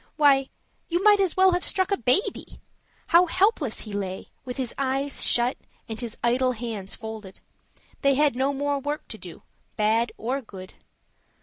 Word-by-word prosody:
Why, 275 Hz, -3 st, +4 dB, 0.4 s
you 350 Hz, +2 st, 0 dB
might 415 Hz, -1 st, +6 dB
as 380 Hz, -3 st, +1 dB
well 375 Hz, 0 st, +6 dB
have 355 Hz, 0 st, 0 dB
struck 375 Hz, -1 st, +2 dB
a -, -, +4 dB
baby! 255 Hz, -, 0 dB, 0.5 s
How 350 Hz, +2 st, +6 dB
helpless 360 Hz, -, +1 dB
he 215 Hz, -, -8 dB
lay, 190 Hz, -2 st, -4 dB, 0.2 s
with 250 Hz, 0 st, -6 dB
his 255 Hz, -3 st, -3 dB
eyes 275 Hz, +1 st, -1 dB
shut, 240 Hz, +2 st, +2 dB, 0.3 s
and 225 Hz, +1 st, -5 dB
his 235 Hz, -2 st, -6 dB
idle 255 Hz, +2 st, +2 dB
hands 220 Hz, -5 st, -6 dB
folded: 220 Hz, -4 st, -9 dB, 0.6 s
they 275 Hz, -1 st, +3 dB
had 290 Hz, -2 st, +3 dB
no 265 Hz, +2 st, +1 dB
more 285 Hz, 0 st, -1 dB
work 290 Hz, +2 st, -4 dB
to -, -, -6 dB
do, -, -, -10 dB, 0.3 s
bad 225 Hz, +2 st, +2 dB
or 255 Hz, +5 st, -2 dB
good. 190 Hz, -5 st, -11 dB
265 Hz, 170 wpm, -25 LUFS, 225-300 Hz, 0.6 s, might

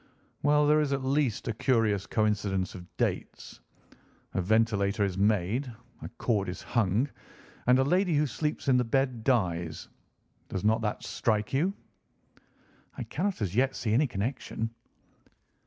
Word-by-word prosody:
"Well, 150 Hz, +1 st, +4 dB
there 150 Hz, +1 st, +4 dB
is 140 Hz, -2 st, 0 dB
at 135 Hz, -1 st, -1 dB
least 135 Hz, -4 st, 0 dB
a 115 Hz, -, 0 dB
curious 110 Hz, -4 st, +1 dB
coincidence 100 Hz, -4 st, 0 dB
of 90 Hz, -1 st, -10 dB
dates. -, -, -3 dB, 0.7 s
A 95 Hz, -, 0 dB
ventilator 105 Hz, 0 st, +2 dB
is 95 Hz, -3 st, -1 dB
made, 105 Hz, +6 st, +1 dB, 0.3 s
a -, -, -6 dB
cord 105 Hz, -6 st, 0 dB
is 90 Hz, -, -6 dB
hung, 115 Hz, +2 st, +1 dB, 0.6 s
and 125 Hz, +1 st, +6 dB
a 130 Hz, -, +4 dB
lady 180 Hz, +4 st, +2 dB
who 150 Hz, +1 st, +3 dB
sleeps 150 Hz, +3 st, -3 dB
in 130 Hz, -2 st, +5 dB
the 125 Hz, -, +3 dB
bed 125 Hz, -1 st, 0 dB
dies. 85 Hz, -, 0 dB, 0.6 s
Does 95 Hz, -, -3 dB
not 110 Hz, +2 st, +3 dB
that 105 Hz, -1 st, -2 dB
strike 105 Hz, 0 st, -1 dB
you?" 160 Hz, +8 st, +2 dB, 1.3 s
"I -, -, -3 dB
cannot 190 Hz, -, -2 dB
as 95 Hz, -1 st, -3 dB
yet 130 Hz, +2 st, +2 dB
see 110 Hz, -3 st, -1 dB
any 140 Hz, +6 st, +4 dB
connection." 115 Hz, 0 st, -3 dB
115 Hz, 150 wpm, -29 LUFS, 100-135 Hz, 1.3 s, and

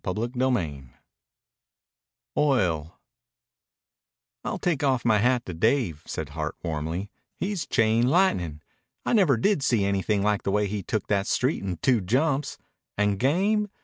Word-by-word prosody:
CHAPTER 105 Hz, +5 st, -2 dB
XVII 90 Hz, -, -1 dB, 1.5 s
OIL 90 Hz, -, +1 dB, 1.4 s
"I'll -, -, -3 dB
take 160 Hz, -5 st, -1 dB
off 130 Hz, -4 st, +1 dB
my 110 Hz, -3 st, +4 dB
hat 125 Hz, +2 st, +2 dB
to 90 Hz, -, -6 dB
Dave," 100 Hz, -, +1 dB
said -, -, -4 dB
Hart -, -, -4 dB
warmly. 80 Hz, +5 st, -3 dB, 0.3 s
"He's 195 Hz, -2 st, -3 dB
chain 115 Hz, +2 st, +2 dB
lightnin'. 90 Hz, -, +1 dB, 0.4 s
I -, -, 0 dB
never 180 Hz, -, +4 dB
did 175 Hz, -, +2 dB
see 120 Hz, -7 st, +2 dB
anything 100 Hz, +1 st, 0 dB
like 105 Hz, -1 st, +1 dB
the -, -, -2 dB
way 105 Hz, +1 st, +2 dB
he 100 Hz, 0 st, -3 dB
took 105 Hz, +3 st, -2 dB
that 100 Hz, -1 st, 0 dB
street 130 Hz, +5 st, 0 dB
in 95 Hz, -3 st, -3 dB
two 120 Hz, +7 st, +2 dB
jumps. 135 Hz, -, 0 dB, 0.4 s
And 105 Hz, -1 st, +1 dB
game? 200 Hz, -, +2 dB
110 Hz, 145 wpm, -26 LUFS, 95-135 Hz, 1.5 s, my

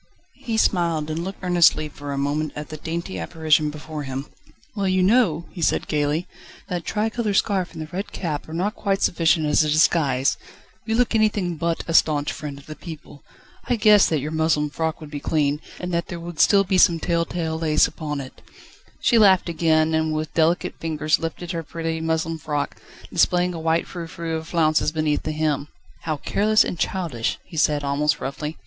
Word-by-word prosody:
He 225 Hz, -3 st, -1 dB
smiled, 165 Hz, -7 st, +1 dB
and 165 Hz, +2 st, -3 dB
looked 190 Hz, +1 st, -7 dB
earnestly 175 Hz, -3 st, +4 dB
for 145 Hz, -1 st, -8 dB
a 140 Hz, -, -3 dB
moment 145 Hz, +2 st, -1 dB
at 150 Hz, 0 st, -6 dB
the 155 Hz, -, -6 dB
dainty 160 Hz, -, -4 dB
apparition 155 Hz, -, +1 dB
before 150 Hz, 0 st, -7 dB
him. 135 Hz, 0 st, -5 dB, 0.5 s
"Well, 200 Hz, -2 st, -1 dB
you 185 Hz, 0 st, +2 dB
know!" 185 Hz, -6 st, +3 dB
he 180 Hz, -, -8 dB
said -, -, +1 dB
gaily, 150 Hz, +3 st, 0 dB, 0.4 s
"that 175 Hz, -2 st, -3 dB
tricolour 220 Hz, -1 st, -1 dB
scarf 190 Hz, -3 st, +1 dB
and 160 Hz, -, -6 dB
the -, -, -6 dB
red 180 Hz, +6 st, -5 dB
cap 155 Hz, -4 st, -4 dB
are -, -, -7 dB
not 195 Hz, +5 st, 0 dB
quite 195 Hz, -3 st, -1 dB
sufficient 160 Hz, -2 st, +2 dB
as 150 Hz, +1 st, +3 dB
a 155 Hz, -, -1 dB
disguise: 150 Hz, -4 st, +3 dB, 0.5 s
you 225 Hz, -, +1 dB
look 245 Hz, 0 st, +2 dB
anything 210 Hz, -5 st, +1 dB
but 165 Hz, +1 st, -1 dB
a 165 Hz, -, -2 dB
staunch 150 Hz, -3 st, +3 dB
friend 145 Hz, -2 st, -7 dB
of 140 Hz, -, -14 dB
the 155 Hz, -, -8 dB
people. 155 Hz, -4 st, -11 dB, 0.4 s
I 245 Hz, -, +1 dB
guessed 210 Hz, -2 st, +5 dB
that 155 Hz, -4 st, 0 dB
your 150 Hz, +3 st, -4 dB
muslin 160 Hz, -2 st, +1 dB
frock 160 Hz, +2 st, -2 dB
would 150 Hz, -1 st, -10 dB
be 145 Hz, -, -4 dB
clean, 150 Hz, 0 st, 0 dB, 0.2 s
and 180 Hz, 0 st, -4 dB
that 170 Hz, 0 st, -1 dB
there 175 Hz, -, -6 dB
would 170 Hz, -1 st, -8 dB
still 200 Hz, -1 st, +5 dB
be 185 Hz, -1 st, +1 dB
some 170 Hz, -2 st, +5 dB
tell 170 Hz, 0 st, +1 dB
tale 160 Hz, -1 st, -3 dB
lace 155 Hz, -2 st, +3 dB
upon 150 Hz, -3 st, -4 dB
it." 130 Hz, -, -11 dB, 0.6 s
She 235 Hz, -, +4 dB
laughed 190 Hz, -4 st, +5 dB
again, 160 Hz, -1 st, +2 dB
and 160 Hz, 0 st, +1 dB
with 155 Hz, 0 st, -3 dB
delicate 165 Hz, +2 st, +1 dB
fingers 155 Hz, -1 st, 0 dB
lifted 165 Hz, +2 st, -5 dB
her 170 Hz, -2 st, -3 dB
pretty 165 Hz, 0 st, -4 dB
muslin 160 Hz, 0 st, -1 dB
frock, 145 Hz, -1 st, -3 dB, 0.3 s
displaying 180 Hz, 0 st, +2 dB
a 165 Hz, -, -5 dB
white 160 Hz, +1 st, +1 dB
frou 170 Hz, -2 st, -7 dB
frou 165 Hz, 0 st, -4 dB
of 160 Hz, 0 st, -8 dB
flounces 155 Hz, -3 st, +2 dB
beneath 155 Hz, -2 st, 0 dB
the 155 Hz, -, -3 dB
hem. 150 Hz, -2 st, -1 dB, 0.4 s
"How 155 Hz, -2 st, -1 dB
careless 215 Hz, +8 st, +3 dB
and 175 Hz, -, -4 dB
childish!" 165 Hz, -14 st, -1 dB
he -, -, -13 dB
said, 150 Hz, -2 st, +2 dB
almost 145 Hz, +2 st, +1 dB
roughly. 150 Hz, +3 st, -5 dB
160 Hz, 200 wpm, -23 LUFS, 150-175 Hz, 0.6 s, guessed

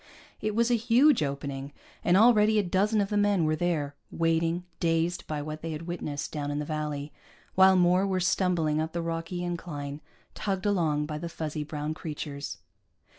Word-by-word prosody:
It 215 Hz, -1 st, -1 dB
was 235 Hz, +1 st, +2 dB
a -, -, +5 dB
huge 240 Hz, -, +4 dB
opening, 140 Hz, -1 st, -3 dB, 0.3 s
and 175 Hz, +1 st, +4 dB
already 215 Hz, -1 st, +5 dB
a 210 Hz, -, +3 dB
dozen 200 Hz, +4 st, +2 dB
of 200 Hz, -, -1 dB
the 210 Hz, -, 0 dB
men 205 Hz, -4 st, +3 dB
were 155 Hz, 0 st, +2 dB
there, 155 Hz, -4 st, -1 dB, 0.2 s
waiting, 165 Hz, +1 st, +1 dB, 0.2 s
dazed 165 Hz, +1 st, 0 dB
by 150 Hz, -1 st, -3 dB
what 155 Hz, +1 st, -6 dB
they 165 Hz, -1 st, -4 dB
had 155 Hz, +2 st, -6 dB
witnessed 160 Hz, -4 st, -4 dB
down 145 Hz, -2 st, -3 dB
in 145 Hz, -, -2 dB
the 150 Hz, -, -2 dB
valley, 150 Hz, -1 st, -4 dB, 0.4 s
while 190 Hz, 0 st, +6 dB
more 180 Hz, +2 st, +4 dB
were 190 Hz, -1 st, 0 dB
stumbling 175 Hz, -4 st, +1 dB
up 160 Hz, 0 st, -3 dB
the 170 Hz, -, -1 dB
rocky 165 Hz, +2 st, -3 dB
incline, 150 Hz, -5 st, -5 dB, 0.3 s
tugged 195 Hz, -2 st, -2 dB
along 160 Hz, -7 st, +1 dB
by 150 Hz, 0 st, -4 dB
the 170 Hz, +1 st, -5 dB
fuzzy 155 Hz, -2 st, -4 dB
brown 150 Hz, 0 st, -4 dB
creatures. 150 Hz, -2 st, -6 dB
165 Hz, 180 wpm, -28 LUFS, 150-190 Hz, 0.4 s, while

